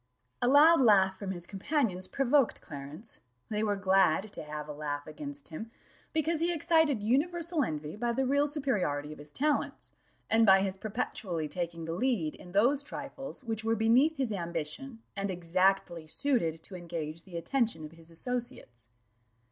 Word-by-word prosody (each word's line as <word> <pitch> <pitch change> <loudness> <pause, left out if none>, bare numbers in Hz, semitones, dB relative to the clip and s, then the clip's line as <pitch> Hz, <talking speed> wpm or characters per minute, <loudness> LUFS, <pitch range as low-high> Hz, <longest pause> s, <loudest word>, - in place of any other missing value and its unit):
A 245 - +2
loud 295 +4 +7
laugh 190 -5 +5
from 200 - -5
his 175 -2 -4
companions 195 - -1
provoked 275 -2 +2
Clarence; 150 +8 -9 0.3
they 210 -1 -1
were 210 -2 +1
glad 195 0 +2
"to - - -6
have 150 0 -6
a 150 - -5
laugh 145 -1 -4
against 285 - -7
him," 180 +8 -7 0.4
because 315 +1 0
he 340 +2 +1
excited 320 -7 +3
universal 325 +6 +1
envy 150 -5 -4
by 240 +2 -1
the 265 +3 0
real 285 +3 +3
superiority 195 - -1
of - - -14
his 145 0 -10
talents, 295 - -1 0.4
and 225 +1 +4
by 190 -2 +7
his 190 -1 -2
perpetually 190 -5 -3
taking 170 +1 -4
the 165 - -3
lead 195 -7 0
in 180 - -12
those 245 +9 +4
trifles 280 -2 -7
which 225 -2 -3
were 225 0 +2
beneath 245 +9 +4
his 255 -5 -1
ambition, 170 - -4
and 200 0 -2
exactly 180 -1 +1
suited 165 - +1
to 195 - -10
engage 165 -2 -5
the 180 -3 -8
attention 225 - 0
of 150 - -10
his 165 0 -14
associates. 165 - -5
200 Hz, 165 wpm, -30 LUFS, 165-270 Hz, 0.4 s, loud